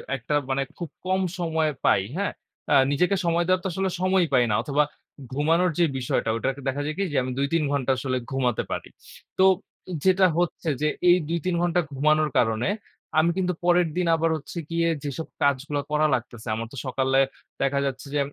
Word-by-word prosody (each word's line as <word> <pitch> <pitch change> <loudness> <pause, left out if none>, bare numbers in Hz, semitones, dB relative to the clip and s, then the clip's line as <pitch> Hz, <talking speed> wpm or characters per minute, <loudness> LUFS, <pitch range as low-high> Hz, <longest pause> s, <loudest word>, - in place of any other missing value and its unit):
একটা 125 +3 -4 0.2
মানে 135 +1 +1 0.2
খুব 170 -4 -5 0.2
কম 190 +1 +1 0.2
সময় 160 -2 +1 0.2
পাই, 95 - +5 0.2
হ্যাঁ? 200 0 0 0.4
আ - - +5 0.2
নিজেকে 180 +7 +2
সময় 170 0 +2
দেওয়ার 185 0 +2
তো - - -1
আসলে 190 0 0
সময়ই 185 -2 +3
পাই 125 -2 +5
না। - - +1
অথবা 145 +1 +2 0.5
ঘুমানোর 165 +6 +2
যে 170 - +6
বিষয়টা 125 -3 -1
ঐটারকে 135 +4 -2
দেখা 140 +2 -1
যায় 155 - -2
কি 200 - 0
যে - - +1
আমি 130 - -3
২-৩ 150 +3 +1
ঘন্টা 135 -2 +1
আসলে 130 0 -1
ঘুমাতে 125 -3 0
পারি। - - -3 0.5
তো 190 - +4 0.6
যেটা 190 0 +5
হচ্ছে 175 -1 -1
যে 150 - +2 0.2
এই 175 - +7
২-৩ 170 +1 -1
ঘন্টা 175 0 +2
ঘুমানোর 155 +2 +2
কারণে 115 +5 +2 0.5
আমি 170 +2 +3
কিন্তু 180 -1 +1
পরের 175 -1 +4
দিন 180 -1 +1
আবার 165 0 +1
হচ্ছে 155 +4 -10
গিয়ে 170 0 +1 0.2
যেসব 145 +3 -4
কাজগুলো 145 +1 +1
করা 155 0 +3
লাগতেছে। 120 -1 -4
আমার 115 +1 -4
তো - - -9
সকালে 130 +1 +1 0.4
দেখা 140 0 +1
যাচ্ছে 135 0 -4
যে 145 - +1
155 Hz, 185 wpm, -25 LUFS, 135-175 Hz, 0.6 s, এই